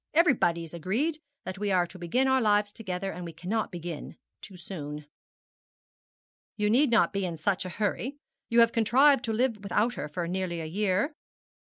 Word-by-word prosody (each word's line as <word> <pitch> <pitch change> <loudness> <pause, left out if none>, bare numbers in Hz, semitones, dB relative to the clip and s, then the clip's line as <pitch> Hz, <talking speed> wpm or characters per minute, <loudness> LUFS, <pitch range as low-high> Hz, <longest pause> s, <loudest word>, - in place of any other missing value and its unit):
Everybody 250 - +3
is 165 - -10
agreed 225 - -1 0.3
that 185 +1 -6
we 205 -1 -1
are 180 -2 +3
to 180 +2 -12
begin 245 +11 +1
our 265 0 +3
lives 205 -2 +3
together, 195 -3 -4
and 180 - -7
we 170 -1 -7
cannot 185 +7 -2
begin 170 -3 -6 0.3
too 190 -3 -11
soon.' 150 -5 -7 1.5
'You 210 -1 +1
need 270 +5 +4
not 220 -7 +3
be 195 0 -1
in 170 -3 -3
such 190 +3 0
a - - -4
hurry. 225 +6 -1 0.3
You 235 0 +5
have 230 0 +5
contrived 260 +4 +4
to 225 - -1
live 225 -1 0
without 210 +4 +1
her 150 - -5
for 170 +3 -4
nearly 180 -1 -2
a 160 - -4
year.' 200 - 0
200 Hz, 185 wpm, -28 LUFS, 175-230 Hz, 1.5 s, You